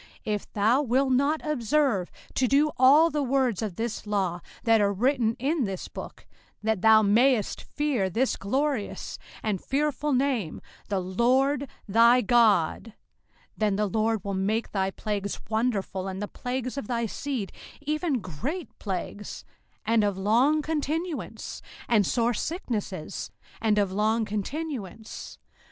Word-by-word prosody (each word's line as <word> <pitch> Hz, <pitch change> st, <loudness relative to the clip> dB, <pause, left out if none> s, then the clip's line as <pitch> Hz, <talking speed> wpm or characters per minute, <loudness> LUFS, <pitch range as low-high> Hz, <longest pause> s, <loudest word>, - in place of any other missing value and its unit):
05:028:058 215 Hz, -, 0 dB
If 205 Hz, -, -8 dB
thou 220 Hz, +7 st, +3 dB
wilt 265 Hz, 0 st, +2 dB
not 280 Hz, +5 st, +2 dB
observe 270 Hz, -8 st, +1 dB, 0.2 s
to 255 Hz, -, +2 dB
do 290 Hz, +4 st, +3 dB
all 290 Hz, +6 st, +6 dB
the 295 Hz, -, 0 dB
words 260 Hz, -5 st, +1 dB
of 210 Hz, -5 st, -3 dB
this 230 Hz, 0 st, -4 dB
law 190 Hz, -4 st, 0 dB, 0.2 s
that 225 Hz, -2 st, +4 dB
are 200 Hz, -1 st, +3 dB
written 230 Hz, +2 st, +1 dB
in 280 Hz, +1 st, 0 dB
this 190 Hz, -2 st, -4 dB
book, -, -, -9 dB, 0.4 s
that 220 Hz, -3 st, 0 dB
thou 220 Hz, 0 st, +7 dB
mayest 225 Hz, +2 st, +3 dB
fear 275 Hz, -10 st, -1 dB
this 245 Hz, +8 st, +1 dB
glorious 265 Hz, +2 st, -2 dB, 0.2 s
and 210 Hz, -4 st, -1 dB
fearful 295 Hz, +1 st, 0 dB
name, 255 Hz, -, 0 dB, 0.3 s
THE 200 Hz, -2 st, +1 dB
LORD 255 Hz, +9 st, +2 dB, 0.2 s
THY 235 Hz, +4 st, +6 dB
GOD; 215 Hz, -7 st, +3 dB
05:028:059 225 Hz, -, -13 dB, 0.6 s
Then 210 Hz, -2 st, +1 dB
the 210 Hz, +1 st, +1 dB
LORD 220 Hz, +1 st, 0 dB
will 200 Hz, -, -3 dB
make 205 Hz, +4 st, -1 dB
thy 190 Hz, -1 st, 0 dB
plagues 200 Hz, 0 st, -3 dB
wonderful, 210 Hz, -4 st, -1 dB
and 190 Hz, 0 st, -4 dB
the 205 Hz, -, -3 dB
plagues 255 Hz, +3 st, -4 dB
of 220 Hz, -, -7 dB
thy 235 Hz, -1 st, 0 dB
seed, 240 Hz, -2 st, -3 dB, 0.3 s
even 300 Hz, -3 st, -1 dB
great 250 Hz, -, -5 dB
plagues, 205 Hz, +1 st, -5 dB, 0.4 s
and 225 Hz, 0 st, +3 dB
of 200 Hz, -2 st, 0 dB
long 245 Hz, +10 st, +3 dB
continuance, 320 Hz, +2 st, -3 dB, 0.3 s
and 215 Hz, -5 st, +3 dB
sore 240 Hz, 0 st, +1 dB
sicknesses, 215 Hz, -, -4 dB, 0.3 s
and 215 Hz, -2 st, +2 dB
of 200 Hz, -2 st, +2 dB
long 220 Hz, +3 st, +1 dB
continuance. 220 Hz, -, -5 dB
230 Hz, 145 wpm, -27 LUFS, 205-275 Hz, 0.6 s, thou